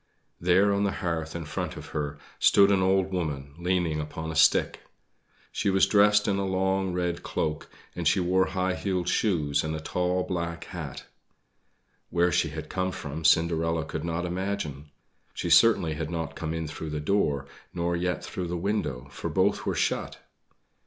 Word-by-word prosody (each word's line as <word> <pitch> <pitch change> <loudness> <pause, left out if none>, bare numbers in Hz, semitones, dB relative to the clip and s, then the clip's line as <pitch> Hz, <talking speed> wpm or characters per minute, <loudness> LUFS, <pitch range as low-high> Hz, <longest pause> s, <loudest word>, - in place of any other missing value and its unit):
There 95 +4 +4
on 100 +1 +1
the 100 -1 +1
hearth 80 -2 -2
in 85 -2 -4
front - - -4
of - - -9
her 75 -1 -3 0.2
stood 100 0 +6
an 95 -2 +3
old 95 0 +2
woman, 75 -6 -3
leaning 85 -3 0
upon 80 +1 -5
a - - -6
stick. 80 - +4 0.7
She - - 0
was 95 0 +4
dressed 105 +1 +4
in 100 -1 +1
a - - 0
long 95 0 0
red 90 -1 -2
cloak, 75 -1 -3 0.3
and - - -1
she - - +4
wore 95 +1 +2
high 95 0 -1
heeled 90 -2 -2
shoes 75 -11 +1
and 80 0 -2
a - - -4
tall 90 +3 -1
black 85 -2 -3
hat. 80 -7 -7 1.0
Where 85 0 +2
she - - +2
had - - -6
come 95 0 -1
from 75 -1 -6
Cinderella 80 -1 +2
could 80 0 -5
not 85 +1 -2
imagine. 90 -6 -3 0.5
She - - -2
certainly 100 -9 +5
had 80 0 -4
not 80 -3 -4
come 80 -1 -4
in 80 -1 -3
through 80 +1 -6
the 75 0 -3
door, 75 -4 +1 0.3
nor 85 0 -1
yet 90 +1 -2
through 90 -2 -4
the 90 +1 -3
window 85 -9 -2
for - - -5
both - - +1
were - - 0
shut. - - -1
85 Hz, 180 wpm, -27 LUFS, 80-95 Hz, 1.0 s, stood